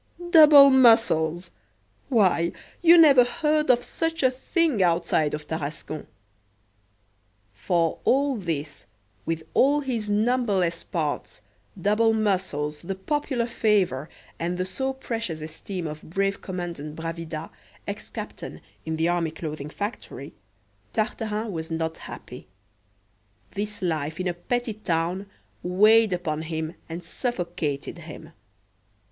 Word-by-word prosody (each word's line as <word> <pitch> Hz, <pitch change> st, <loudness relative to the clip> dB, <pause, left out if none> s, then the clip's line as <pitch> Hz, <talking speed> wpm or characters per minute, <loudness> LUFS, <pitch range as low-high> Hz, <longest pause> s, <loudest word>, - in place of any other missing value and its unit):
"Double 300 Hz, -4 st, +9 dB
muscles!" 225 Hz, -10 st, +4 dB, 0.6 s
why, 185 Hz, -8 st, +3 dB, 0.3 s
you 345 Hz, 0 st, +8 dB
never 285 Hz, -6 st, +8 dB
heard 300 Hz, +4 st, 0 dB
of 245 Hz, -1 st, +5 dB
such 325 Hz, +1 st, -2 dB
a 260 Hz, -, +5 dB
thing 270 Hz, -, 0 dB
outside 165 Hz, -4 st, +2 dB
of 150 Hz, 0 st, -8 dB
Tarascon! 155 Hz, 0 st, -5 dB, 1.5 s
For 165 Hz, -, 0 dB
all 275 Hz, +1 st, +2 dB
this, 160 Hz, -8 st, -4 dB, 0.4 s
with 165 Hz, -1 st, -2 dB
all 290 Hz, +2 st, +4 dB
his 235 Hz, -6 st, -3 dB
numberless 205 Hz, -6 st, +1 dB
parts, 150 Hz, -9 st, -3 dB, 0.4 s
double 210 Hz, +4 st, +3 dB
muscles, 185 Hz, -9 st, -1 dB
the 190 Hz, +3 st, -4 dB
popular 260 Hz, +3 st, -1 dB
favour, 195 Hz, -, +1 dB, 0.3 s
and 175 Hz, +2 st, -2 dB
the 185 Hz, -, -1 dB
so 265 Hz, +8 st, -2 dB
precious 230 Hz, -10 st, -4 dB
esteem 165 Hz, +4 st, -6 dB
of 155 Hz, 0 st, -6 dB
brave 195 Hz, +3 st, -1 dB
Commandant 170 Hz, -5 st, -5 dB
Bravida, 165 Hz, -1 st, -5 dB, 0.4 s
ex -, -, -5 dB
captain -, -, -7 dB, 0.3 s
(in 160 Hz, -, -1 dB
the 160 Hz, +1 st, +1 dB
Army 175 Hz, -2 st, +1 dB
Clothing 155 Hz, -2 st, -6 dB
Factory), 205 Hz, +8 st, -6 dB, 0.6 s
Tartarin 215 Hz, -1 st, -2 dB
was 160 Hz, -2 st, -5 dB
not 160 Hz, 0 st, -2 dB
happy: 125 Hz, -4 st, -10 dB, 1.0 s
this 205 Hz, 0 st, -5 dB
life 160 Hz, -1 st, -2 dB
in 185 Hz, -, -1 dB
a 175 Hz, -, 0 dB
petty 240 Hz, +6 st, -2 dB
town 180 Hz, -1 st, -2 dB, 0.3 s
weighed 215 Hz, +4 st, +5 dB
upon 165 Hz, -4 st, -2 dB
him 160 Hz, 0 st, -4 dB, 0.2 s
and 170 Hz, +2 st, -6 dB
suffocated 170 Hz, -, -3 dB
him. -, -, -10 dB
185 Hz, 120 wpm, -25 LUFS, 160-230 Hz, 1.5 s, Double